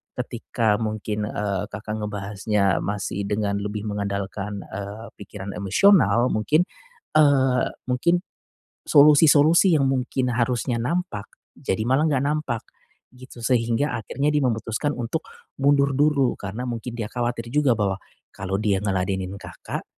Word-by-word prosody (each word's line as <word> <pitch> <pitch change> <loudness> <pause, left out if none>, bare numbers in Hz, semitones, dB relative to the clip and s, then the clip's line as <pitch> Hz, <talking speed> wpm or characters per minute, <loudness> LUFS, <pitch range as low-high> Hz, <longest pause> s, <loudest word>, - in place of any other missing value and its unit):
ketika 120 -3 -1
mungkin, 105 -1 -3
eee, 100 -3 -2
Kakak 105 +1 -5
ngebahasnya 100 -1 0
masih 100 -1 -3
dengan 100 -1 -1
lebih 105 +1 -4
mengandalkan, 100 0 -4
eee, 100 +3 -6
pikiran 100 -1 -8
emosional 120 - +4
mungkin, 150 +11 +2 0.5
eee, 135 -4 +4 0.2
mungkin, 170 +8 +2 0.7
solusi-solusi 150 +4 +6
yang 140 - +2
mungkin 130 -1 -1
harusnya 120 0 0
nampak 145 - -2 0.3
jadi 95 - -3
malah 135 +6 +2
nggak 140 -3 +1
nampak, 145 -6 -1 0.5
gitu. 125 -1 -13
Sehingga 120 +3 +1
akhirnya 140 +6 -1
dia 150 - +2
memutuskan 115 +4 -1
untuk 125 +6 -3 0.3
mundur 140 0 +3
dulu 140 -1 +2
karena 105 +5 -5
mungkin 120 0 -5
dia 115 -3 -3
khawatir 120 -1 -2
juga 145 -4 +3
bahwa 100 -2 0 0.4
kalau 95 0 -3
dia 105 -3 +1
ngeladenin 95 -1 -2
Kakak - - -7
115 Hz, 125 wpm, -23 LUFS, 105-140 Hz, 0.7 s, solusi-solusi